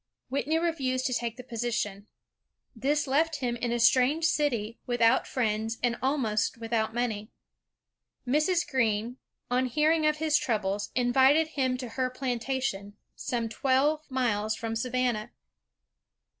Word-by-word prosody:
Whitney 280 +4 0
refused 275 -7 -1
to 255 - 0
take 235 -1 -2
the 250 - -8
position. 225 -4 -3 0.7
This 290 +5 0
left 310 +4 +1
him 245 -4 -2
in 240 0 -2
a 240 - 0
strange 260 +7 +4
city, 240 -9 0
without 240 0 +3
friends 225 -2 -1
and 240 -1 +2
almost 260 -7 0
without 225 -1 -1
money. 220 -3 -2 1.0
Mrs. 310 +7 +2
Greene, 235 -3 0 0.3
on 255 +1 +2
hearing 305 +4 +2
of 305 0 +1
his 305 -1 +2
troubles, 205 -4 -1
invited 265 +5 +4
him 260 -4 0
to 250 -2 -6
her 255 +2 -1
plantation, 250 -5 -3 0.2
some 235 -2 -2
twelve 270 +6 +1
miles 220 -5 0
from 225 0 -4
Savannah. 245 -2 -1
250 Hz, 130 wpm, -28 LUFS, 225-275 Hz, 1.0 s, strange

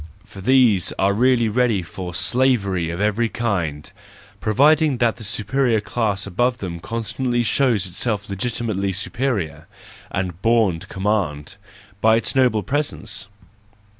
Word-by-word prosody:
For 95 - -11
these 120 -5 +4
are 100 +1 +2
really 120 +1 +3
ready 110 -3 +1
for 90 +1 -7
slavery 100 -9 +1
of 85 +1 -4
every 105 +3 +1
kind, 90 -12 -2 0.5
provided 145 +5 +3
that 120 -1 +1
the 115 - -9
superior 115 +3 +1
class 105 -1 -2
above 120 +6 0
them 90 -5 -6
constantly 120 +4 -2
shows 115 -5 +2
itself 100 +3 -2
legitimately 100 -1 -2
superior, 95 - -3 0.4
and 90 -2 -4
bom 115 -7 +2
to - - -12
command—by 100 +2 -2
its 115 - 0
noble 125 -6 +2
presence! 135 -8 -3
110 Hz, 125 wpm, -21 LUFS, 95-120 Hz, 0.5 s, these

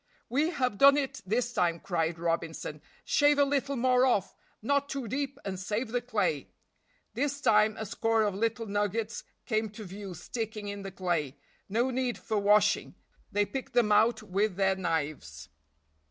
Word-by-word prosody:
"We 290 +7 +2
have 255 - -1
done 280 +1 +8
it 275 -2 -2
this 240 +4 0
time," 170 -4 +1
cried 165 -2 -1
Robinson, 165 -2 -3 0.2
"shave 290 0 +4
a 285 - +6
little 280 0 0
more 255 0 +3
off, 225 -7 +1 0.2
not 280 +5 0
too 270 -4 -4
deep, 275 +3 -3
and 190 -2 -4
save 215 +5 -2
the 245 +1 -1
clay." 255 - -1 0.6
This 285 0 -1
time 215 -4 +4
a 220 - -4
score 225 +2 +1
of 205 -2 0
little 230 +3 -1
nuggets 205 +2 -2 0.2
came 220 -2 0
to 215 +2 -9
view 195 -1 -8
sticking 220 +2 -5
in 200 0 -5
the 195 - -6
clay; 170 -7 -2 0.3
no 235 +6 +1
need 250 -1 -1
for 220 -2 -2
washing, 210 +1 +3 0.4
they 205 0 +2
picked 265 +4 -6
them 235 -3 +3
out 220 +1 +4
with 200 0 0
their 190 0 +2
knives. 150 - -3
215 Hz, 170 wpm, -29 LUFS, 190-250 Hz, 0.6 s, done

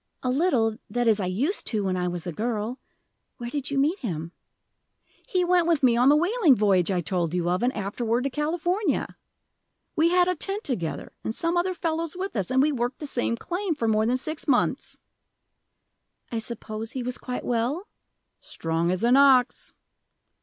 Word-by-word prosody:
"A 255 - +1
little 250 -7 +1
that 240 -1 0
is, 220 -2 +4
I 185 - -1
used 260 - -1
to, 215 -3 0
when 190 -1 0
I 180 0 -1
was 175 -1 -4
a 175 - -3
girl. 225 - -2 0.6
Where 240 -1 -6
did 285 -1 -3
you 280 - -2
meet 305 +8 +2
him?" 170 - -4 1.0
"He 365 -2 +2
went 350 -1 +3
with 325 -5 +2
me 245 -2 +5
on 250 +3 +5
the 290 - +6
whaling 350 - +4
voyage 195 -5 +3
I 185 -2 +1
told 170 +1 -1
you 175 -1 0
of, 180 - 0
and 245 +1 +2
afterward 225 +4 -1
to 275 - -1
California. 345 +7 -1 0.8
We 325 +2 +4
had 360 0 +4
a 365 - +2
tent 395 +6 -3
together, 180 - -3
and 220 - -3
some 335 +1 -1
other 365 +1 +1
fellows 330 0 -2
with 385 -3 -4
us, 195 -5 -1
and 260 +1 +3
we 305 - +2
worked 245 -1 -2
the 300 - -6
same 240 -4 -1
claim 355 - -2
for 235 -6 -1
more 215 0 +2
than 250 +2 +2
six 310 +5 -5
months." 260 -4 +1 1.3
"I 230 - -1
suppose 220 -1 -5
he 260 - -3
was 250 +1 -3
quite 250 -1 -5
well?" 250 - -1 0.5
"Strong 165 +1 -2
as 185 +3 -1
an 245 +3 +5
ox." 265 -2 +4
250 Hz, 190 wpm, -26 LUFS, 215-315 Hz, 1.3 s, the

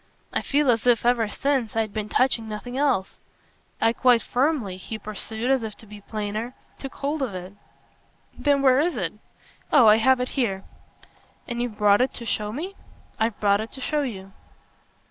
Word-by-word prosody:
I - - 0
feel 285 -2 +2
as 230 0 -1
if, 235 -1 +3
ever 240 -2 +3
since, 265 0 -1
I'd 220 -2 -1
been 215 -1 -3
touching 235 -3 +1
nothing 215 +4 -6
else. 265 -9 0 0.6
I 225 - +3
quite 245 -1 +4
firmly," 250 - 0
he 220 +4 -6
pursued 220 +3 -3
as 265 -2 +3
if 220 -2 -6
to - - -14
be 210 -1 -12
plainer, 215 +3 -4 0.2
"took 270 - -7
hold 290 +2 -2
of 240 -8 -2
it." 185 +1 -7 0.8
"Then 285 -1 +1
where 260 -1 +5
is 335 +4 +1
it?" - - -2 0.6
"Oh 275 -6 +7
I 215 0 +7
have 260 +3 +4
it 250 - -1
here." 200 -8 -1 0.8
"And 240 -1 -3
you've 240 -3 -4
brought 205 +1 +4
it 255 - 0
to 235 - -7
show 210 -2 -1
me?" 335 - -5 0.5
"I've 220 -1 0
brought 200 0 +3
it 220 - -7
to - - -8
show 300 +2 0
you." 195 -8 -5
230 Hz, 185 wpm, -24 LUFS, 210-265 Hz, 0.8 s, Oh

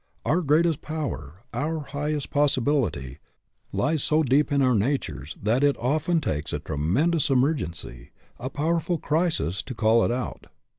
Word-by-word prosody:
Our 170 +5 +2
greatest 160 0 +2
power, 110 - -5
our 155 +6 -1
highest 145 0 -3
possi 145 -1 +3
bility, 120 - 0 0.5
lies 155 0 0
so 155 +3 +2
deep 145 +3 +2
in 140 - +2
our 130 -1 +4
natures 100 - -1
that 115 +6 +1
it 145 -1 +3
often 155 +7 +1
takes 75 - -2
a - - 0
tremendous 95 - 0
emergency, 125 - -1 0.3
a 125 +2 -4
powerful 165 +4 0
crisis, 155 - 0
to 130 - -8
call 110 +1 +4
it - - +1
out. 125 +1 -4
140 Hz, 150 wpm, -25 LUFS, 110-155 Hz, 0.5 s, our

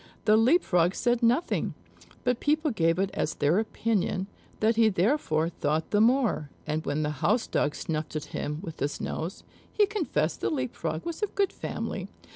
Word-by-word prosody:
The 215 0 +6
Leap 255 +11 +4
frog 175 0 +2
said 240 0 +1
nothing; 240 +8 +1 0.5
but 250 -1 +1
people 305 0 +1
gave 165 -5 +2
it 195 0 0
as 160 - -1
their 150 +7 +2
opinion, 210 -4 -1 0.3
that 220 +1 +3
he 225 -1 +5
therefore 185 - +1
thought 155 -1 -1
the 205 - +4
more; 230 - +2 0.2
and 155 +1 -2
when 145 +2 -1
the 150 - 0
housedog 170 -5 +1
snuffed 155 -1 -3
at 155 -1 -2
him 150 +2 -3
with 165 -5 -7
his 145 - -2
nose, 165 +4 -4 0.3
he 420 - +4
confessed 405 -5 -1
the - - +1
Leap 260 -5 -2
frog 160 -1 -4
was 335 +3 -4
of 420 - -2
good 400 -1 +1
family. - - -4
205 Hz, 180 wpm, -28 LUFS, 160-250 Hz, 0.5 s, The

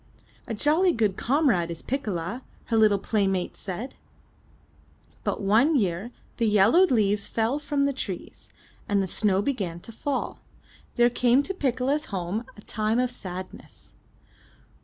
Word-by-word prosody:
"A 225 - -3
jolly 325 - +3
good 215 -6 +1
comrade 245 - +2
is 165 -1 -6
Piccola," 220 -4 -3 0.2
her 230 - -1
little 215 -2 +5
play 200 0 0
mates 190 -2 -2
said. 210 +7 -5 1.3
But - - -2
one 230 +11 +4
year, 180 -9 +1
when 240 - -9 0.3
the 230 - +1
yellowed 220 - +5
leaves 210 -4 +2
fell 230 +6 0
from 290 -1 -1
the 280 0 +1
trees, 195 -8 -7 0.4
and 205 -1 +2
the 195 - +1
snow 195 +1 +1
began 195 -11 -2
to 230 - -11
fall, 275 +4 -3 0.6
there 240 0 +4
came 250 +3 +3
to 385 - -3
Piccola's 275 -1 0
home 195 +4 -3
a 210 - -13
time 215 +1 -1
of 250 0 +1
sadness. 185 -5 -9
225 Hz, 150 wpm, -26 LUFS, 195-265 Hz, 1.3 s, little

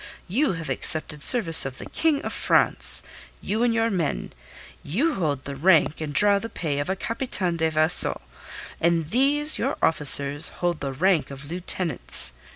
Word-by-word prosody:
You 255 - -1
have 165 -2 -8
accepted 155 -2 +2
service 165 - +6
of 135 -1 -7
the - - -9
King 310 -3 -1
of - - -5
France - - 0 0.4
you 215 +3 -4
and 240 -1 +1
your 225 0 -1
men; 165 - -4 0.5
you 260 - -2
hold 145 - -3
the 140 - -7
rank 160 0 +1
and 155 -2 -5
draw 200 +6 +2
the 230 - -8
pay 150 -8 -5
of 145 - -5
a 190 - -2
Capitaine 195 -5 -2
de 160 0 -1
Vaisseau, 155 +2 +1 0.6
and 165 -2 -1
these 290 +5 +3
your - - -3
officers 145 -2 +4
hold 175 -3 -4
the 140 - -5
rank 170 +4 -1
of 140 +2 -11
lieutenants. 175 -4 -3
170 Hz, 165 wpm, -22 LUFS, 150-215 Hz, 0.6 s, service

